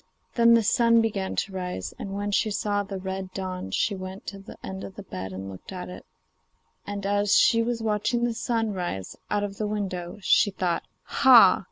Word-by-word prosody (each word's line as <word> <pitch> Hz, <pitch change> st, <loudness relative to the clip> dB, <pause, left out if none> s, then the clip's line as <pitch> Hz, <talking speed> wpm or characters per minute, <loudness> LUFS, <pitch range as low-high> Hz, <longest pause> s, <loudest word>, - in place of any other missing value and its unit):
Then 235 Hz, -1 st, +6 dB
the 230 Hz, -, +3 dB
sun 230 Hz, +2 st, +4 dB
began 205 Hz, -4 st, -1 dB
to 200 Hz, -, -1 dB
rise, 180 Hz, -, -4 dB
and 195 Hz, 0 st, -5 dB
when 205 Hz, 0 st, -2 dB
she 215 Hz, -, +2 dB
saw 205 Hz, 0 st, 0 dB
the 195 Hz, -1 st, -5 dB
red 190 Hz, 0 st, -5 dB
dawn 185 Hz, -, -4 dB
she 205 Hz, -, 0 dB
went 190 Hz, 0 st, -7 dB
to 200 Hz, -, -10 dB
the 195 Hz, -, -12 dB
end 190 Hz, 0 st, -6 dB
of 190 Hz, -, -8 dB
the 205 Hz, -, -8 dB
bed 95 Hz, -, -6 dB
and 95 Hz, +1 st, -6 dB
looked 95 Hz, -, -11 dB
at 180 Hz, -1 st, -6 dB
it, 180 Hz, -, -10 dB, 0.8 s
and 200 Hz, -1 st, -4 dB
as 205 Hz, 0 st, +3 dB
she 230 Hz, -1 st, +5 dB
was 230 Hz, 0 st, -2 dB
watching 220 Hz, +2 st, 0 dB
the 240 Hz, -1 st, +1 dB
sun 225 Hz, -2 st, -1 dB
rise, 175 Hz, -, -4 dB
out 205 Hz, 0 st, 0 dB
of 200 Hz, -1 st, -4 dB
the 215 Hz, -, -1 dB
window, 190 Hz, -4 st, -4 dB
she 205 Hz, -, +4 dB
thought, 180 Hz, -3 st, -1 dB, 0.2 s
'Ha! 240 Hz, -8 st, +7 dB
200 Hz, 205 wpm, -26 LUFS, 185-215 Hz, 0.8 s, Ha